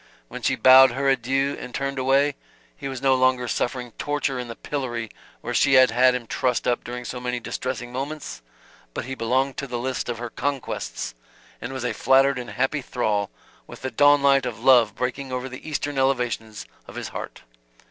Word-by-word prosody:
When - - -7
she - - +1
bowed 130 -1 +7
her 140 +2 -1
adieu 135 +1 +1
and 125 - -8
turned 140 0 -2
away, 135 +2 +3 0.4
he - - -6
was 135 -1 -6
no 135 -1 +5
longer 130 -1 +2
suffering 125 0 -2
torture 145 -3 -1
in 125 - -5
the 115 - -7
pillory 120 -6 -4 0.3
where - - -4
she 140 - +3
had 130 -2 +7
had 125 +2 +4
him 125 -2 -4
trussed 125 +1 -1
up 120 -1 +1
during 125 +1 -6
so 125 - -5
many 125 0 -2
distressing 120 0 -4
moments, 140 - -5 0.5
but - - -3
he 130 - -5
belonged 130 +3 0
to 140 - -4
the 125 -2 -3
list 125 +1 -3
of 120 - -2
her 120 0 -6
conquests 125 - -3 0.5
and - - -5
was 130 -2 -5
a 125 - -1
flattered 135 0 +3
and 120 - -7
happy 135 +3 -1
thrall, 105 -6 -1 0.4
with - - -12
the 130 - -3
dawn 145 0 +5
light 135 -2 +4
of 115 -1 -7
love 125 -3 +5
breaking 130 +2 -3
over 125 +1 -3
the 130 +4 -9
eastern 145 -2 -2
elevations 120 -5 -1 0.2
of - - -11
his - - -5
heart. - - -8
130 Hz, 200 wpm, -24 LUFS, 120-135 Hz, 0.5 s, bowed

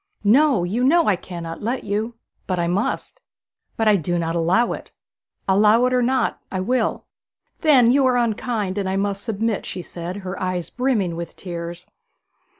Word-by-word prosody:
'No; 250 -1 +4
you 210 +8 -1
know 330 +5 +4
I 205 - +4
cannot 170 -2 -7
let 240 +4 -2
you.' 215 +3 -2 0.3
'But 185 - -1
I 170 - +1
must.' 200 - -2 0.6
'But 225 - +1
I 210 -1 +6
do 175 +1 -1
not 165 0 -1
allow 175 +8 +2
it.' - - -9 0.6
'Allow 210 +5 +5
it 255 - +1
or 250 - +3
not, 255 0 0
I 190 - -2
will.' 250 +7 0 0.5
'Then 260 -7 +5
you 270 0 +4
are 250 -1 +3
unkind, 220 -4 -1
and 190 -1 -1
I 190 - -1
must 200 0 -1
submit,' 225 -1 -1
she 180 - -5
said, 175 +1 -6
her 185 +1 -5
eyes 185 -2 -2
brimming 230 -9 0
with 170 -1 -6
tears. 170 -1 -7
205 Hz, 175 wpm, -22 LUFS, 180-245 Hz, 0.6 s, I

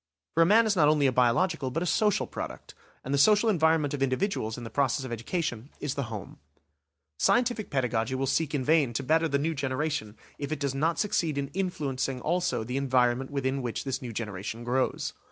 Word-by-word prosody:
For 165 - +3
a 165 - +6
man 225 +4 +6
is 215 -2 +1
not 155 -5 +4
only 150 -1 +3
a 135 - +4
biological 130 +5 +2
but 165 +7 -2
a - - -2
social 210 +3 +2
product, - - -7 0.3
and 135 - -2
the 140 - +2
social 210 +8 +5
environment 160 -5 +2
of 145 - -3
individuals 130 - -1
in 120 - -7
the 115 - -7
process 135 -1 0
of 130 - -7
education, 120 +1 -3
is 145 -3 -2
the 140 - -3
home. 105 -4 -8 0.8
Scientific 240 -3 +2
pedagogy 125 -2 0
will 135 +1 -1
seek 150 +3 0
in 135 - 0
vain 150 -5 +3
to 135 - -2
better 160 +4 +2
the 140 -2 +1
new 160 +3 -1
generation 135 -5 -2 0.2
if 140 +1 -4
it 155 - -2
does 140 -2 -1
not 160 +5 0
succeed 170 -8 0
in 140 -1 -2
influencing 140 -9 -2
also 175 -3 0
the 125 +4 -3
environment 130 -1 +1
within 135 -1 -1
which 120 -2 -3
this 135 -1 -3
new 125 -2 -6
generation 110 +1 -5
grows! 125 +2 -1
140 Hz, 210 wpm, -28 LUFS, 125-165 Hz, 0.8 s, a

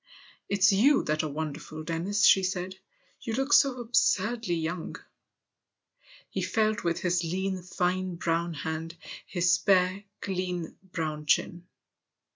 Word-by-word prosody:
" - - -28
It's 200 -1 +4
you 270 +9 +4
that 155 0 0
are 155 - -3
wonderful, 155 +1 -5
Dennis," 175 +6 0
she 190 - +7
said; 185 0 -3 0.2
" - - -37
you 225 - -4
look 270 +4 0
so 270 -3 +5
absurdly 225 -3 +1
young." 165 +1 -3 1.3
He - - -4
felt 215 -2 0
with 170 -1 -1
his 180 -1 +1
lean, 190 +2 -2
fine 180 0 -1
brown 170 0 -1
hand 160 +2 -5 0.3
his 175 -1 +1
spare, 185 +1 +2
clean 180 -3 -3 0.2
brown 155 -3 -3
chin. 175 +4 +1
180 Hz, 135 wpm, -28 LUFS, 165-200 Hz, 1.3 s, she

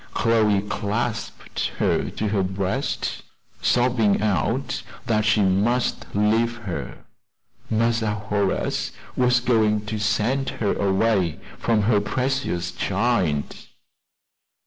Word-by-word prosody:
Chloe 110 -3 +3
clasped 110 +3 -3
her - - +1
to 110 - -2
her 100 -1 +1
breast, 95 0 -2 0.4
sobbing 120 -4 +3
out 105 -3 0 0.2
that 110 -2 +1
she 105 0 +3
must 105 +7 +1
leave 110 +3 +2
her. 100 -7 -6 0.6
"Massa 115 -1 +1
Horace 105 -1 -1 0.2
was 125 -1 +3
going 110 -4 +2
to 105 0 -3
send 110 +6 +1
her 105 - +1
away 95 -3 +1 0.2
from 110 -3 +2
her 105 -1 +3
precious 125 -7 -1
child." 95 -8 0
105 Hz, 100 wpm, -23 LUFS, 100-115 Hz, 0.6 s, Chloe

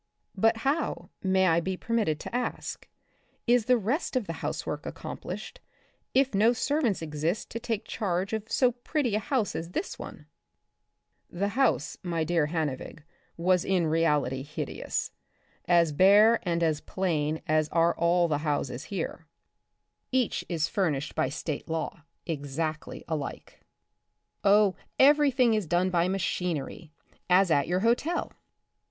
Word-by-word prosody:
" - - -42
But 225 0 +4
how, 295 +3 -1
may 190 0 +3
I 165 -2 +4
be 185 +2 -3
permitted 215 -10 0
to - - -6
ask, 250 - -4 0.6
is 240 -2 +3
the 250 0 +4
rest 245 - -1
of 250 -4 +1
the 165 - -4
housework - - -3
accomplished, - - -7 0.6
if 270 -1 +3
no 220 +4 +4
ser 285 +6 0
vants 210 - 0
exist 160 +5 -2
to 230 - -4
take 225 -2 -3
charge 190 0 -2
of 220 0 -4
so 250 -2 +3
pretty 245 0 -2
a 210 - +2
house 225 0 -1
as 165 +2 -5
this 380 - -3
one? - - -9 0.5
'* - - -50
(The 200 - +2
house, 240 - +1
my 170 -3 -1
dear 160 -2 +1
Hannevig, 155 -2 -3 0.3
was 180 +1 +2
in 185 -3 +1
reality 150 -5 +1
hideous, 150 +3 -4 0.5
as 170 -2 +4
bare 205 +8 +6
and 170 -2 -1
as 155 -2 +1
plain 160 -5 -1
as 155 0 +2
are 170 0 +3
all 170 +1 +3
the 150 -3 0
houses 145 -3 -2
here. 165 -3 -5 0.8
Each 255 -3 +1
is 165 -2 0
furnished 150 -7 -1
by 130 - 0
state 150 +2 -5
law, 160 -1 -4 0.2
exactly 155 0 -4
alike). 155 -4 -5 0.8
Oh, 200 -1 +5 0.2
every 290 +1 +6
thing 250 -3 +3
is 215 -5 0
done 180 +3 +1
by 175 0 +2
machinery, 180 -5 -2 0.4
as 180 0 +5
at 140 -2 +3
your 180 +2 0
hotel. 245 - +1
180 Hz, 150 wpm, -28 LUFS, 160-225 Hz, 0.8 s, bare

